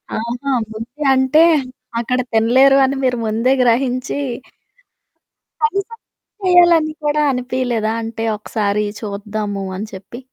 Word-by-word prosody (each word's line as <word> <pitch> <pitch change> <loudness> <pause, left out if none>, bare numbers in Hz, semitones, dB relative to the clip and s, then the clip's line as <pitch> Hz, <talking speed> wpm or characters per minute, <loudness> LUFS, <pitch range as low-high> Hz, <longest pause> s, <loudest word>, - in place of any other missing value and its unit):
ఆహా! 240 +5 -3 0.2
ముందే 240 +7 -7
అంటే, 265 +4 +4 0.6
అక్కడ 250 +2 -1
తినలేరు 255 +5 +5
అని 270 +1 -1
మీరు 250 -1 +1
ముందే 225 +4 +1
గ్రహించి 250 +3 0 1.4
కనీసం 455 0 -1
ట్రై 390 -4 -6
చేయాలని 335 -3 +5
కూడా 300 +1 +1
అనిపీయలేదా 250 -3 -1
అంటే, 225 0 -5
ఒకసారి 210 -1 -1 0.2
చూద్దాము 205 -1 -4
అని 215 - -5
చెప్పి? 195 +5 -9
245 Hz, 110 wpm, -18 LUFS, 220-275 Hz, 1.4 s, తినలేరు